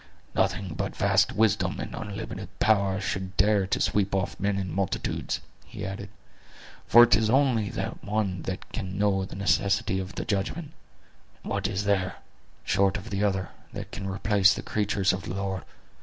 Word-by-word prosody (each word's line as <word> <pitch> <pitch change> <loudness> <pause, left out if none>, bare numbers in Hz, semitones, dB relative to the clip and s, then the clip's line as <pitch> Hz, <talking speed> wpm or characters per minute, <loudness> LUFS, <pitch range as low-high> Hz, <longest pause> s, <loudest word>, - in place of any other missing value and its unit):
"Nothing 95 -5 0
but 95 +4 -3
vast 100 -1 +3
wisdom 110 0 +2
and - - -5
unlimited 100 -1 -6
power 100 -3 +3
should 95 0 -3
dare 100 -1 +3
to - - 0
sweep 100 -1 +1
off 95 -2 -2
men 100 0 0
in 95 -2 -3
multitudes," 95 0 -2 0.2
he - - -7
added; 95 0 -5 0.8
"for 120 - +9
it 120 -4 +6
is 110 +1 +1
only 125 -5 +3
the - - -2
one 100 -4 -1
that 95 - -4
can 95 0 -4
know 100 -2 +2
the - - -9
necessity 100 0 +1
of 95 +1 -6
the - - -3
judgment; 120 - -2 0.7
and - - -6
what - - 0
is 95 +2 -2
there, 95 -2 +1 0.5
short 95 +1 +2
of 105 +3 -9
the 100 +1 0
other, 95 -2 0 0.2
that - - -6
can 95 -1 -5
replace 100 0 +3
the - - -5
creatures 100 -2 +1
of 95 - -3
the 90 - -4
Lord? 95 -1 -2
100 Hz, 175 wpm, -27 LUFS, 95-105 Hz, 0.8 s, for